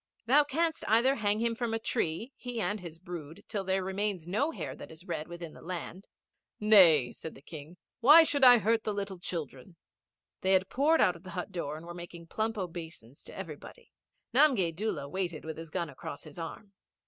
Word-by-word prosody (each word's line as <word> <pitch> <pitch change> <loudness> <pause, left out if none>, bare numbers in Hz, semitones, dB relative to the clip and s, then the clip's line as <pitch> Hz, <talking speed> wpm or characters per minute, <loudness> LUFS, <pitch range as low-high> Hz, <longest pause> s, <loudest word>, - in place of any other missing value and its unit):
Thou 280 +6 +5
canst 320 +3 -1
either 235 +5 +4
hang 210 0 +1
him 235 0 +1
from 230 -1 -2
a - - -2
tree, 225 - -1
he 245 -2 -6
and 210 -1 -1
his 170 -3 -9
brood, 165 -3 -9
till 205 -3 -3
there 190 0 0
remains 190 -2 -2
no 215 - +1
hair 325 - -6
that - - -10
is 160 +3 -13
red 160 -4 -4
within 175 -2 -8
the - - -14
land.' 180 +2 -7 0.5
'Nay,' 175 - +6
said 160 - -9
the - - -13
King. 155 +2 -10 0.2
'Why 295 +7 +9
should 290 -4 +1
I 250 -1 +10
hurt 225 +1 +1
the 210 - -2
little 200 -2 -4
children?' 165 -2 -6 0.7
They 190 +1 +2
had 190 0 +2
poured 305 +5 +3
out 180 -4 +4
of 170 - -13
the 185 - -11
hut 180 - -4
door 155 -5 -4
and 160 - -11
were 175 - -7
making 175 -1 -9
plump 220 +1 -2
obeisance 165 - -7
to - - -11
everybody. 165 -6 -9 0.4
Nanigay 250 - +4
Doola 165 -5 -3
waited 175 -1 -4
with 160 -1 -6
his 165 -1 -8
gun 170 +1 -2
across 140 0 -8
his 155 +1 -11
arm. 195 +5 -8
185 Hz, 205 wpm, -30 LUFS, 165-225 Hz, 0.7 s, I